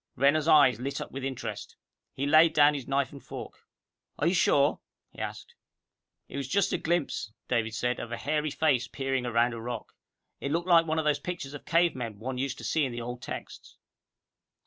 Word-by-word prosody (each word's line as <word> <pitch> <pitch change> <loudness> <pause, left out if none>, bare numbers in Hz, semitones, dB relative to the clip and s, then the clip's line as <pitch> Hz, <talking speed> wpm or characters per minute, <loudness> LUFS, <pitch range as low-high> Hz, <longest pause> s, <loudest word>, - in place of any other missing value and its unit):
Renner's 145 +3 +3
eyes 145 -6 +6
lit 135 +3 -3
up - - -6
with 135 0 -6
interest. 130 -2 -5 0.4
He 135 - -2
laid 155 +2 +6
down 150 0 +6
his 140 -4 -5
knife 135 -1 0
and 140 -2 -11
fork. - - -9 0.5
"Are 145 - 0
you 170 - +3
sure?" 145 -5 +3 0.3
he - - -14
asked. - - -6 0.7
"It - - -7
was 140 -2 -3
just 200 +8 +1
a - - 0
glimpse," 165 -10 -1 0.2
David 115 -2 0
said, 125 +1 -1
"of 120 - -6
a 120 - -3
hairy 150 +1 -1
face 140 -5 +1
peering 135 -2 -2
around 120 0 +2
a 115 - -6
rock. 120 -1 -6 0.5
It 140 - -3
looked 170 +3 -1
like 165 -2 +5
one 160 0 0
of 160 - 0
those 150 -1 +2
pictures 175 -6 -5
of 145 - -7
a - - -39
cave 170 +1 +3
man 115 -5 -5
one 125 +4 -4
used 135 0 -2
to - - -10
see 160 - +1
in 135 - -1
the 120 - -5
old 120 +1 -6
texts." - - -8
140 Hz, 215 wpm, -28 LUFS, 125-155 Hz, 0.7 s, eyes